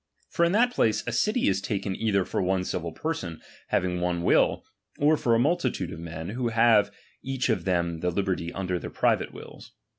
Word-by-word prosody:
For 170 - +1
in 170 - +3
that 245 +4 +4
place, 110 - +1
a 120 - -2
city 215 - +1
is 95 0 +1
taken 100 -1 -2
either 100 -4 +1
for - - -2
one 95 0 +1
civil 85 -2 -3
person, 85 - -4 0.3
having 90 -1 0
one 90 -1 -1
will; - - +3 0.3
or 150 +2 +4
for 120 -5 +2
a - - +2
multitude 170 +8 0
of - - -8
men, 85 0 -6
who 120 +3 -2
have 115 -3 +4 0.3
each 135 -1 -2
of 115 - 0
them 85 -3 0
the 90 +2 0
liberty 90 -2 -2
of 95 -1 -4
their 90 -1 -2
private - - +1
wills. - - -12
100 Hz, 200 wpm, -26 LUFS, 90-120 Hz, 0.3 s, that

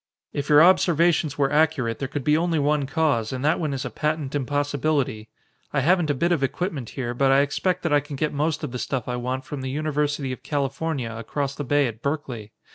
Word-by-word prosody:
"If 145 0 -3
your 150 +1 +8
observations 170 -4 +3
were 140 -2 +2
accurate, 150 -7 +2
there 135 - -2
could 140 +1 -4
be 150 +2 +3
only 165 0 +1
one 145 -1 +1
cause 140 -8 +1
and 130 +1 -3
that 155 +2 +3
one 155 -4 -1
is 135 -1 -3
a - - -4
patent 150 -2 -2
impossibility. 145 -4 -1 0.4
I 135 - +2
haven't 175 +2 +3
a 145 - +2
bit 170 +7 +1
of 165 -5 +2
equipment 140 - -2
here, 120 -2 -2
but 135 +2 +2
I 135 +1 +6
expect 180 +5 -1
that 165 -3 +1
I 145 - +6
can 145 0 -8
get 150 +2 -1
most 150 +2 -1
of 145 - -3
the 125 - -4
stuff 130 -2 -3
I 125 - -2
want 130 +2 -3
from 145 -2 -6
the 130 - -4
University 150 -1 -1
of 130 - -6
California 140 -3 -2
across 135 +5 -3
the 145 - -5
bay 145 +1 +2
at 115 -2 -5
Berkeley. 130 -7 -4
145 Hz, 225 wpm, -24 LUFS, 130-155 Hz, 0.4 s, your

